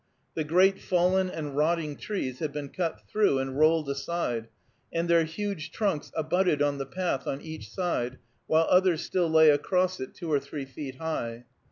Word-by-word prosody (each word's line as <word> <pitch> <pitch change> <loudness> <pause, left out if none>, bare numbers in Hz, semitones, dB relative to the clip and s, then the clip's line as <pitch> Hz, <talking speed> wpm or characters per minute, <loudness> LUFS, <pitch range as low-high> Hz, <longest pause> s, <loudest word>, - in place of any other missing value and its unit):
The 160 - -1
great 185 +5 +4
fallen 185 +1 +2
and 150 -5 -5
rotting 155 0 +1
trees 135 -12 -4
had 155 -3 -2
been 145 -1 -5
cut 170 -1 -3
through 210 -10 +2
and 135 0 -2
rolled 155 -1 +4
aside, 140 -5 -2 0.4
and 170 +1 -1
their 170 -1 +4
huge 170 -1 -4
trunks 195 -8 -1
abutted 160 0 +1
on 145 -1 +1
the 135 - -4
path 175 -2 -2
on 135 - -2
each 155 -9 -8
side, 130 -5 -2 0.3
while 160 +1 +4
others 180 -3 +4
still 175 -3 0
lay 160 -1 +7
across 180 +5 +1
it 130 - -6
two 170 -3 -5
or 145 - +4
three 140 0 -6
feet 135 0 -7
high. 125 -6 -4
160 Hz, 180 wpm, -28 LUFS, 140-180 Hz, 0.4 s, lay